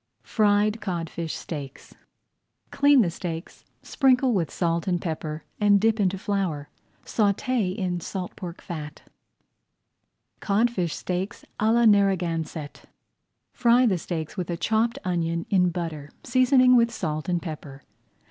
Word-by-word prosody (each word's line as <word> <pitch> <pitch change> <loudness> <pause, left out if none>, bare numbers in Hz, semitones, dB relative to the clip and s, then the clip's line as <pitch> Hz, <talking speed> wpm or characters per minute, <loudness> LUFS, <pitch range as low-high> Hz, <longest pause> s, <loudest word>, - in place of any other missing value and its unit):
FRIED 210 0 +2
CODFISH 170 -4 -4
STEAKS 140 -5 -8 0.8
Clean 285 -1 +5
the 175 - -1
steaks, 165 -1 -7 0.2
sprinkle 260 -2 +3
with 175 -7 0
salt 170 -1 -1
and 175 -2 +1
pepper, 155 -2 -4 0.2
and 205 -1 +5
dip 220 +1 +2
into 195 -1 +1
flour. 185 -8 -2 0.4
Sauté 205 -1 0
in 180 -3 -2
salt 180 +1 -6
pork 175 -2 -8
fat. 155 -4 -7 1.4
CODFISH 200 -5 0
STEAKS 185 +2 -4
À 215 +1 +3
LA 235 +1 +4
NARRAGANSETT 175 -7 +1 0.7
Fry 245 0 +4
the 190 -7 +2
steaks 160 -1 -5
with 180 -3 -4
a 170 - -2
chopped 225 +6 +1
onion 170 -2 -1
in 180 -2 +4
butter, 165 -4 -5
seasoning 255 0 +4
with 235 -1 +4
salt 155 -6 -4
and 175 -1 +1
pepper. 150 -5 -8
185 Hz, 130 wpm, -25 LUFS, 165-220 Hz, 1.4 s, Clean